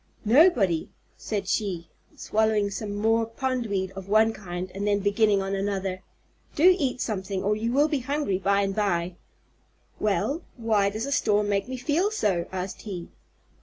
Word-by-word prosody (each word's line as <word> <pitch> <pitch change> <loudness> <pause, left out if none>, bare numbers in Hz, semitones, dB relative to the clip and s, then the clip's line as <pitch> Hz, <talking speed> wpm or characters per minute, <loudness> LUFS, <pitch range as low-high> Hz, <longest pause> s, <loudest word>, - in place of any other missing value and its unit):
"Nobody," 220 - +4 0.3
said 200 -3 -4
she, 185 -5 -1 0.3
swallowing 215 -2 +1
some 205 0 -4
more 225 +2 +2
pondweed 230 -6 -2
of 195 0 -9
one 220 +2 +4
kind 180 -2 -6
and 200 +1 -3
then 205 0 +3
beginning 205 0 +2
on 195 0 -3
another. 195 -1 -2 0.5
"Do 360 +5 +6
eat 260 -4 -1
something 195 -4 -3
or 210 +1 +2
you 225 +2 -2
will 285 +4 +4
be 295 -4 -1
very 275 +4 -2
hungry 200 -11 0
by 200 +1 +2
and 195 -1 -1
by." 180 -4 0 0.8
"Well, 215 - 0 0.2
why 215 -4 +2
does 215 +4 -4
a 280 - -4
storm 210 -7 +2
make 200 +1 0
me 260 0 -5
feel 305 +10 +1
so?" 200 - 0
asked 185 0 -5
he. 185 -5 -7
205 Hz, 165 wpm, -26 LUFS, 195-230 Hz, 0.8 s, Do